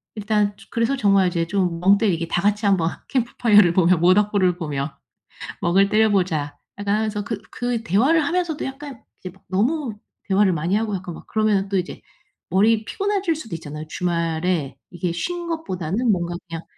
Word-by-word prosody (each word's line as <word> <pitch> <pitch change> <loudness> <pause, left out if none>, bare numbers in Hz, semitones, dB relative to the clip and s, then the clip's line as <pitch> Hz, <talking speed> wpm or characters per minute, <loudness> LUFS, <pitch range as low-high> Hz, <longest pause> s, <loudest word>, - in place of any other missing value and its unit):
일단 210 -1 0
조 - - -17
그래서 230 +4 +1
정말 200 -6 +3
이제 170 -1 -1
좀 180 -2 -1
멍때리기 190 -2 +2
다 175 - 0
같이 205 +2 +1
한번 185 -5 +3 0.2
캠프파이어를 225 -7 +3
보며 180 0 +4
모닥불을 185 +1 +3
보며 145 -4 -4 0.6
"멍을 195 +3 +3
때려보자." 185 -9 +1 0.2
약간 205 0 0
하면서 215 -1 -1
그 205 -1 -5
그 245 -2 -2
대화를 260 - +3
하면서도 340 -2 -1
약간 270 -2 -8 0.2
이제 185 - -8 0.2
너무 235 - 0 0.3
대화를 195 -1 +3
많이 170 +4 0
하고 215 -1 -1
약간 180 -2 -6
막 - - -13
그러면 215 -3 +1
또 195 - 0
이제 180 -1 -4 0.5
머리 215 +5 +3
피곤해질 400 - -1
수도 225 - -7
있잖아요. 150 -1 -7
주말에 170 -3 -1
이게 175 0 -3
쉰 345 - -3
것보다는 225 - -1
뭔가 175 -2 -1
그냥 165 0 -6
200 Hz, 365 characters per minute, -22 LUFS, 175-225 Hz, 0.6 s, 보며